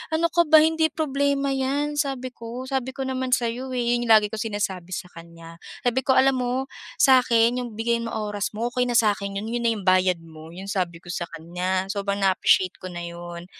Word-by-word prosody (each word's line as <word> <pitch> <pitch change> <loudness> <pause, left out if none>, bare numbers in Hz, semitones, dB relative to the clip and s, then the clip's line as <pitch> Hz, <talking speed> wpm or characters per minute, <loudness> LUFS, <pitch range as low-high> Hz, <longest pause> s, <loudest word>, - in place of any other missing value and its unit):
"Ano 335 +1 +2
ka 345 - +4
ba, 315 0 +8
hindi 320 0 +2
problema 280 -2 0
yan." 280 +3 -1
Sabi 260 -3 -2
ko. 235 +2 -8
Sabi 260 -1 -2
ko 270 - -3
naman 260 -1 -2
sayo, 240 +2 -3
eh, 245 - 0
yun 240 - -1
yung - - +3
lagi 210 -1 +4
kong 220 0 -3
sinasabi 185 -3 -3
sakanya. 165 -2 -10 0.3
Sabi 245 +1 +2
ko, 265 - +3
"Alam 265 0 +4
mo, 245 0 -1 0.5
sa 260 -1 +7
akin 235 +1 +3
yung 235 -3 -7
bigay 235 +1 0
mo 230 - -4 0.2
oras 205 0 -2
mo, 230 +2 -1
okey 250 - +1
na 240 - -1
sakin 200 -2 +1
yun. 215 - -6
Yun 240 - -1
na 230 - +3
yung 205 -4 -5
bayad 185 -2 +3
mo." 160 -1 -13
Yun 185 +3 -9
sabi 175 -3 -2
ko 175 - -23
sa 175 -2 -4
kanya. 180 +3 -2
Sobrang 200 0 -2
naa-appreciate 190 -1 +2
ko 185 - -6
na 175 -1 -6
yun. 170 0 -8
230 Hz, 215 wpm, -24 LUFS, 185-260 Hz, 0.5 s, ba